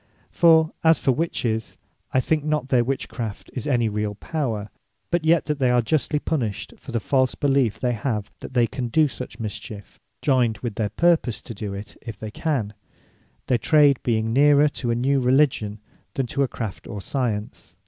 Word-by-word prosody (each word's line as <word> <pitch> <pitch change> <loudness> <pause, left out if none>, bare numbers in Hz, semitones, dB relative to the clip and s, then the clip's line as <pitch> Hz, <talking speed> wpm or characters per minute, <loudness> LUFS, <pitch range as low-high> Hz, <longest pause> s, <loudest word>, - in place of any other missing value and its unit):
For 160 -2 +5
as 160 0 +6
for 135 - +1
Witches, 120 -6 -2 0.3
I 130 - +3
think 150 +3 0
not 150 0 0
that 130 - -16
their 120 - +5
witch 135 +2 -2
craft 110 -5 -6
is 125 - -4
any 120 -5 +2
reall 105 -1 -2
power; 115 -6 -3 0.4
but 175 -2 +1
yet 160 +1 +3
that 150 -1 -2
they 130 -2 +3
are 125 -1 +3
justly 150 +4 0
punished, 125 -10 -2
for - - -10
the 115 - 0
false 130 +3 +1
beliefe 135 -6 +1
they 125 - +1
have, 110 -3 -2
that - - -10
they 120 -1 +5
can 125 +1 -4
do 155 +6 +3
such 125 -5 -8
mischiefe, 105 -1 -7 0.2
joyned 125 -6 +2
with 120 -3 -2
their 105 0 -1
purpose 160 -2 +2
to - - -7
do 100 -2 -5
it 100 +2 -8
if 115 -3 -8
they 110 -1 -7
can; 125 -7 -2 0.7
their 125 - +1
trade 145 -3 +4
being 115 -1 0
neerer 145 +2 +5
to 125 -4 -4
a 115 - +2
new 135 +3 +2
Religion, 125 -5 +2 0.4
than 135 - 0
to 135 +4 -2
a 135 - +3
Craft 110 -5 -6
or 105 - -6
Science. 105 - -3
125 Hz, 195 wpm, -23 LUFS, 110-145 Hz, 0.7 s, as